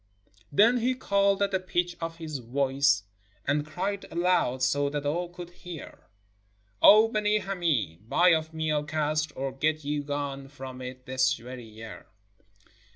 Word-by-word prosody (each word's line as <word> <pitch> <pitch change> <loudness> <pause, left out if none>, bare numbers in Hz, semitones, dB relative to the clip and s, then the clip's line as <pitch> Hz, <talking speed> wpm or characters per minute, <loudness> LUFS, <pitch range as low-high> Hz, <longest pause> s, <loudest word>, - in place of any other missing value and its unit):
Then 220 +11 +5
he 250 +2 +1
called 200 -4 +2
at 200 - 0
the 190 - +1
pitch 175 -1 -1
of 165 0 -3
his 155 -4 -5
voice, 135 0 +1 0.4
and 145 +1 +1
cried 195 +4 -3
aloud 170 -7 +1
so 140 +2 +2
that 145 0 -3
all 170 +4 -1
could 175 0 -9
hear: 175 -3 -10 0.4
" 105 0 -40
O 215 +2 +8
Benee 215 -1 +1
Hameed, 140 - -2
buy 180 +1 +5
of 160 -1 +2
me 160 -1 -2
Al 150 -1 +1
Kasr 155 0 -1
— - - -30
or 135 0 -3
get 155 +3 0
you 145 +1 -1
gone 140 -1 -4
from 130 -2 -9
it 130 0 -8
this 130 +2 +2
very 125 +1 -9
year 110 0 -11
150 Hz, 165 wpm, -28 LUFS, 130-180 Hz, 0.4 s, O